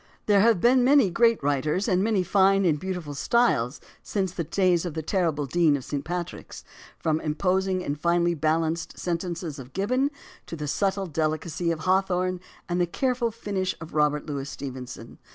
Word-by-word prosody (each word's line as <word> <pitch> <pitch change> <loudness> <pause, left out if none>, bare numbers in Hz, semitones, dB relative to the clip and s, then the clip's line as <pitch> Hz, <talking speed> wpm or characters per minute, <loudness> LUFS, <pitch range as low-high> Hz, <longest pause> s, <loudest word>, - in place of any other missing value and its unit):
There 205 -1 +4
have 225 -3 +4
been 245 +5 +4
many 270 -7 +5
great 230 -2 +3
writers 150 - 0
and 185 -3 +2
many 210 -4 +1
fine 195 +1 +3
and 155 -4 +2
beautiful 180 -4 -4
styles 140 - +1 0.2
since 190 -3 -2
the 170 -1 -3
days 175 +1 +2
of 175 -4 -5
the 160 - -3
terrible 160 -5 0
Dean 155 0 +3
of 130 - -9
St. 145 -1 -3
Patrick's, 175 0 -6 0.3
from 155 -2 0
the - - -10
imposing 185 +4 0
and 145 -3 -3
finely 175 0 +2
balanced 160 +1 -1
sentences 170 -3 -3
of 130 0 -11
Gibbon 255 +9 +1 0.4
to - - -6
the 150 -2 -5
subtle 195 +5 0
deli 155 -2 0
cacy 170 +2 -3
of 160 -2 -3
Hawthorne 185 0 +1 0.3
and 175 0 0
the 175 - +2
careful 250 +4 0
finish 200 -4 -3
of 165 0 -10
Robert 150 -1 +1
Louis 140 -1 -4
Stevenson. 125 -4 -8
175 Hz, 180 wpm, -26 LUFS, 155-195 Hz, 0.4 s, many